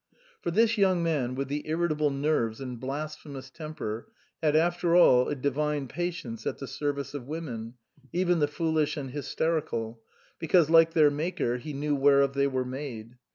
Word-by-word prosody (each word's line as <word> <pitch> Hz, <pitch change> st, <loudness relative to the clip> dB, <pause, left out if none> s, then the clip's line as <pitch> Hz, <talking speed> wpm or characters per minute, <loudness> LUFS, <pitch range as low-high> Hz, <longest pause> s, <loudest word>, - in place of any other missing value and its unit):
For -, -, -2 dB
this 225 Hz, +4 st, +3 dB
young 185 Hz, -3 st, +3 dB
man 140 Hz, -7 st, 0 dB
with 135 Hz, 0 st, -2 dB
the 145 Hz, +2 st, -4 dB
irritable 155 Hz, -2 st, +1 dB
nerves 135 Hz, -6 st, 0 dB
and 125 Hz, -3 st, -6 dB
blasphemous 140 Hz, 0 st, -6 dB
temper 140 Hz, -9 st, -6 dB, 0.3 s
had 155 Hz, -2 st, +2 dB
after 175 Hz, +1 st, +2 dB
all 125 Hz, -8 st, +6 dB
a 145 Hz, -, -1 dB
divine 145 Hz, +1 st, -1 dB
patience 165 Hz, -8 st, -4 dB
at -, -, -2 dB
the 135 Hz, -, -6 dB
service 140 Hz, 0 st, -3 dB
of 135 Hz, -4 st, -6 dB
women, 125 Hz, -7 st, -5 dB, 0.4 s
even 175 Hz, -1 st, +1 dB
the 145 Hz, -, +3 dB
foolish 160 Hz, 0 st, 0 dB
and 135 Hz, -3 st, -5 dB
hysterical; 145 Hz, -6 st, -2 dB, 0.4 s
because 165 Hz, -1 st, +3 dB
like 165 Hz, 0 st, +6 dB
their 150 Hz, -3 st, +5 dB
Maker 150 Hz, -5 st, -1 dB
he 150 Hz, +4 st, -7 dB
knew 145 Hz, +1 st, -1 dB
whereof 140 Hz, 0 st, +4 dB
they 140 Hz, 0 st, +2 dB
were 130 Hz, -2 st, -1 dB
made. 125 Hz, -3 st, -7 dB
145 Hz, 165 wpm, -28 LUFS, 130-160 Hz, 0.4 s, all